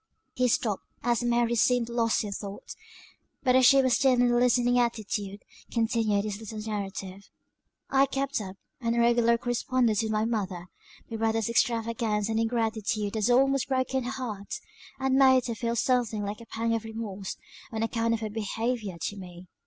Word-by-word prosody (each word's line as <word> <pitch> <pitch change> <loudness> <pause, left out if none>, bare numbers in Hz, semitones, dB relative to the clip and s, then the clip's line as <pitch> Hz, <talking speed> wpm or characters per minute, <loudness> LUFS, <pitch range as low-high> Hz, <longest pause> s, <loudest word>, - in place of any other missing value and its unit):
He 250 0 +2
stopped, 220 -4 0 0.2
as 240 0 +1
Mary 240 0 +2
seemed 240 0 +2
lost 230 -2 +1
in 205 - -5
thought; 200 0 -7 0.7
but 255 -2 +3
as 260 -1 +6
she 275 +1 +6
was 260 -2 +2
still 265 +1 +4
in 245 -1 +3
a - - +2
listening 245 0 +3
attitude, 210 -4 -2 0.3
continued 225 -3 +1
his 205 -1 -4
little 220 0 -8
narrative. 200 -2 -5 0.6
"I 275 0 +3
kept 275 -2 -2
up 190 -2 -7 0.2
an 230 -2 -1
irregular 235 0 +4
correspondence 245 -2 +1
with 220 -1 -2
my 215 0 +1
mother; 190 -6 -3 0.4
my 225 - -3
brother's 225 0 0
extravagance 225 -2 0
and 220 0 0
ingratitude 220 -2 -1
had 220 +1 0
almost 270 +1 +3
broken 260 -1 0
her - - -2
heart, 230 -7 -5 0.4
and 265 0 +2
made 260 -2 +5
her 235 - -2
feel 230 +1 -2
something 235 -3 +1
like 205 +2 -5
a 230 - -13
pang 230 +1 -1
of 225 -1 -1
remorse, 220 -4 -6 0.3
on 220 -1 -2
account 230 0 0
of 225 - -6
her 215 - -3
behaviour 225 -2 -3
to 205 - -4
me. 180 -1 -10
230 Hz, 175 wpm, -28 LUFS, 215-245 Hz, 0.7 s, as